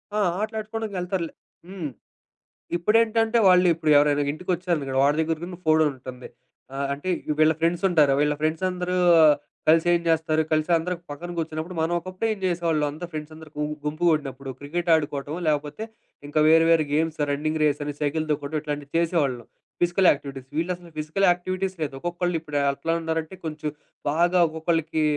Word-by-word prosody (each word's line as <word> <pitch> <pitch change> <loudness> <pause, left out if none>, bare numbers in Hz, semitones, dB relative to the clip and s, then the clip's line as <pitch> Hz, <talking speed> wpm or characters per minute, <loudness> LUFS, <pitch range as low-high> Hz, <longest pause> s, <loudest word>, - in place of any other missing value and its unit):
ఆ! - - +1 0.2
ఆటలాడుకోడానికెళ్తారులే 210 -5 -3 0.3
హ్మ్. 185 -6 -5 0.9
ఇప్పుడేంటంటే, 225 +4 +2
వాళ్ళిప్పుడు 175 -4 +4
ఎవరైనా 145 0 +3
ఇంటికొచ్చారనుకోండి, 170 -5 -2
వాడి 145 +2 +3
దెగ్గర 160 0 0
గూడా 175 0 -7
ఫోను 155 -1 +5
ఉంటుంది. 130 -1 -10 0.5
ఆహ్, 140 +1 -1
అంటే 145 +6 -5 0.3
వీళ్ళ 155 +1 +5
ఫ్రెండ్స్ 170 +3 +1
ఉంటారు. 150 -5 +4
వీళ్ళ 150 0 +2
ఫ్రెండ్స్ 155 +3 0
అందరూ 180 0 -2 0.7
కలిసి 165 +2 +5
ఏం 170 - +3
జేస్తారు? 160 -1 +2
కలిసి 155 +1 +1
అందరు 165 +2 -1
ఒక 170 - -26
పక్కన 175 +5 -7
కూర్చునప్పుడు 160 +2 -4
మనం 165 +2 0
ఒకప్పుడు 185 +4 -5
ఏం - - -9
జేసేవాళ్ళం. 170 -4 +1
అంత 155 +4 -10
ఫ్రెండ్స్ 155 0 -6
అందరూ 160 0 -12
గు 150 - 0 0.2
గుంపు 155 +3 -3
గూడినప్పుడు 135 -3 -2
క్రికెట్ 170 +5 -3
ఆడుకోవటం 145 -1 -1
లేకపోతే 150 +7 -1 0.4
ఇంకా 155 +1 0
వేరే 165 +1 +6
వేరే 165 -2 +5
గేమ్స్ 160 +1 0
రన్నింగ్ 155 +2 -1
రేస్ 145 -1 +1
అని, 145 0 -4
సైకిల్ 155 +2 -1
దొక్కడం 145 +1 -3
ఇట్లాంటివి 145 -1 -5
చేసేవాళ్ళం. 150 -8 0 0.4
Physical 175 +2 +3
activities. 140 -2 -6
వీళ్ళసలు 175 +1 -3
ఫిజికల్ 155 +6 0
యాక్టివిటీస్ 185 +2 -2
లేదు. 140 -3 -2
ఒక్కొక్కళ్ళు 175 +1 -2
ఇప్పుడు 150 -3 -4
ఎట్లా 160 +4 -2
ఉన్నారంటే, 160 +2 -3
కొంచెం 155 -1 -3 0.4
బాగా 175 +3 +2
ఒక్కొక్కళ్ళకి 160 0 -1
160 Hz, 155 wpm, -24 LUFS, 150-175 Hz, 0.9 s, వేరే